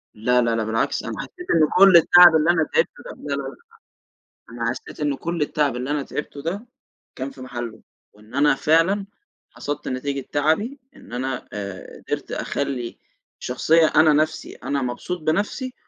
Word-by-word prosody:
لا، 125 +3 +2
لا، 115 -1 +1
لأ، 110 - 0
بالعكس 110 +1 -1
أنا - - -5
حسّيت 360 -1 -9
إنه 155 -2 +4
كلّ 195 -2 +9
التعب 175 0 +8
اللي 160 +2 +3
أنا 165 -2 +2
تعبته 480 - -1
ده - - -7
لا، - - -17
لا، - - -3
لأ - - -6 1.0
أنا 115 0 -2
حسّيت 130 - -8
إن 145 -2 0
كلّ 170 -2 -3
التعب 145 -4 0
اللي 130 +3 -4
أنا 145 -1 0
تعبته 145 -1 -6
ده 195 +9 -4 0.5
كان 135 +1 -5
في 130 - -14
محلُّه، 120 -3 -7 0.3
وإن 105 +4 -19
أنا 145 0 +4
فعلًا 165 +8 +2 0.4
حصدت 145 0 -5
نتيجة 140 +2 -3
تعبي، 160 - +1 0.2
إن - - -15
أنا 130 +1 -4
آآ 100 -2 -7
قدرت - - -3
أخلّي، 130 -4 -3 0.4
شخصية 160 +6 +3
أنا 155 -1 +6
نَفْسي 155 +1 0
أنا 140 -1 -3
مبسوط 155 +8 -4
بنفْسي 205 - -1
145 Hz, 170 wpm, -22 LUFS, 125-165 Hz, 1.0 s, كلّ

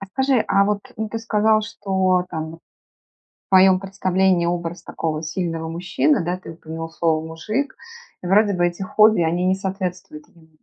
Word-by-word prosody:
А 195 - -7
скажи, 265 +4 +1
а 200 0 +4
вот, 205 0 -3
ну, 220 0 -3
ты 225 - -4
сказал, 215 -1 +2
что 190 -4 0
там 160 0 -5
вот 165 - -13 0.7
в - - -
твоем 190 -1 +6
представлении 190 -2 +1
образ 170 0 -3
такого 155 -2 -4
сильного 165 0 -3
мужчины, 180 - 0
да, 175 +2 -1
ты 185 - -10
упомянул 165 0 -7
слово 160 -1 0
"мужик", 215 - -3 0.5
вроде 200 +3 +3
бы 175 -1 +2
эти 175 +2 -4
хобби, 215 0 +4
они 170 +2 0
не 185 +1 +3
соответствуют 185 -5 -5
ему. 160 -2 -22
185 Hz, 170 wpm, -21 LUFS, 165-200 Hz, 0.7 s, твоем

